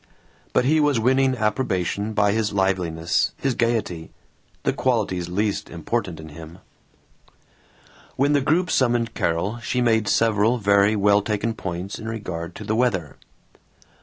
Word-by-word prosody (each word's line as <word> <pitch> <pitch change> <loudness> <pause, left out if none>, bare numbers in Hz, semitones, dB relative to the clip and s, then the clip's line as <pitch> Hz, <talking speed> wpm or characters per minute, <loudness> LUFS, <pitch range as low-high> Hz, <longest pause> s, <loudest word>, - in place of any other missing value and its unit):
But - - +2
he 155 +4 +3
was 145 -5 +2
winning 130 +2 +2
approbation 105 -2 -1
by 105 -1 +3
his 105 -1 -1
liveliness, 90 -4 0
his 135 -2 0
gaiety 110 -9 -1 0.5
the - - +1
qualities 100 -9 -1
least 100 +3 -1
important 90 0 -3
in 80 0 -9
him. 80 +2 -11 1.6
When 140 +2 +2
the 145 - +3
group 165 +6 +1
summoned 120 -3 +1
Carol 90 +4 -1
she 125 +2 -2
made 110 -3 +2
several 115 +2 +2
very 100 0 +3
well 100 0 +4
taken 105 +2 -2
points 95 -1 -5
in 110 - -7
regard 90 -6 -5
to - - -8
the 110 +1 -1
weather. 95 - 0
105 Hz, 140 wpm, -23 LUFS, 95-120 Hz, 1.6 s, well